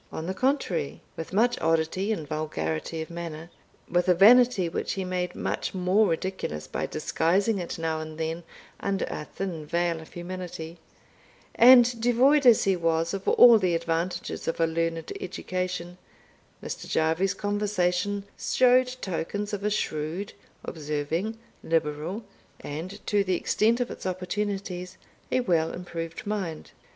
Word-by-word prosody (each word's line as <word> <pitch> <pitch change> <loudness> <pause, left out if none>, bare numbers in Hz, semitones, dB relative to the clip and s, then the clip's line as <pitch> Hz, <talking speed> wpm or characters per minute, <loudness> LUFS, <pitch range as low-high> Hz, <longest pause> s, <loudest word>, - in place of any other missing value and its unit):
On 160 - -5
the 185 - -2
contrary, 190 - -1 0.2
with 165 - -6
much 235 +5 +2
oddity 165 +5 +1
and 160 -9 -3
vulgarity 155 - -3
of 160 - -12
manner, 170 -1 -7 0.4
with 175 +1 +1
a 180 - +6
vanity 230 0 +6
which 165 - -2
he 190 -1 -3
made 180 -1 -2
much - - -3
more 190 +4 +3
ridiculous 165 - -3
by - - -3
disguising 195 +6 +1
it 175 - -5
now 160 -1 -1
and 155 0 -7
then 160 +1 -3 0.4
under 195 -1 -1
a 150 - -5
thin 175 -4 -5
veil 170 +1 -1
of 160 - -14
humility, 175 -2 -7 0.7
and 245 -1 +7
devoid 255 +4 +4
as 235 - +7
he 195 -1 +3
was 165 0 0
of 195 0 -5
all 235 -2 +8
the 180 -3 +1
advantages 165 +2 -2
of 165 - -1
a 165 - +4
learned 165 0 -2
education, 180 -1 -4 0.6
Mr. - - -6
Jarvie's 165 +5 +1
conversation 205 -1 0 0.2
showed 255 0 +4
tokens 205 +4 -3
of 200 -1 -3
a 210 - +2
shrewd, 165 -1 -2 0.3
observing, 155 +7 -3 0.3
liberal, 160 +5 -1 0.4
and, 175 +8 -7
to 205 -1 +2
the 185 -2 0
extent 225 +6 +2
of 245 - -1
its - - -6
opportunities, 185 0 -3 0.3
a 255 - +2
well 165 -7 +1
improved 165 -2 -6
mind. 195 -7 -4
180 Hz, 145 wpm, -27 LUFS, 165-205 Hz, 0.7 s, all